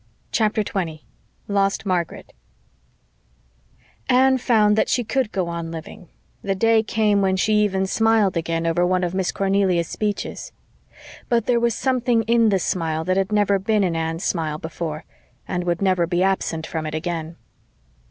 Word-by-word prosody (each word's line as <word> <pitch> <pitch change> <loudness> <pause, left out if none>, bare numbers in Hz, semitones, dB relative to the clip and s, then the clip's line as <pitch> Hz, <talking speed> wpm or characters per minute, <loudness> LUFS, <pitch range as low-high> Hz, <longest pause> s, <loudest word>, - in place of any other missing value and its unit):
CHAPTER 215 -1 +1
20 165 -6 -4 0.4
LOST 200 0 0
MARGARET 180 -3 -3 1.8
Anne 260 +1 +4
found 215 -4 +3
that 220 - +1
she 245 - +1
could 240 0 -1
go 185 -3 -1
on 170 -1 -4
living; 165 +3 -9 0.3
the 195 -1 -1
day 225 +2 +3
came 215 -2 +1
when 190 -1 +2
she 210 +3 +1
even 190 -2 +1
smiled 220 -1 +2
again 165 0 -1
over 165 +1 +1
one 185 0 +1
of 175 0 -2
Miss 190 -1 0
Cornelia's 195 -3 +1
speeches. 210 +2 -4 0.8
But 235 -3 +2
there 240 -1 +2
was 235 -1 +1
something 245 -3 +1
in 230 0 +3
the 195 - +3
smile 165 -3 -1
that 185 +2 0
had 195 +1 0
never 205 -2 +2
been 210 +1 +1
in 175 -3 0
Anne's 165 +1 -2
smile 155 -4 -1
before 160 -1 -6 0.4
and 180 0 -2
would 175 +2 -1
never 185 -3 +2
be 175 +1 +1
absent 180 -4 -1
from 160 -1 -4
it 155 - -4
again. 165 0 -4
190 Hz, 160 wpm, -22 LUFS, 170-215 Hz, 1.8 s, Anne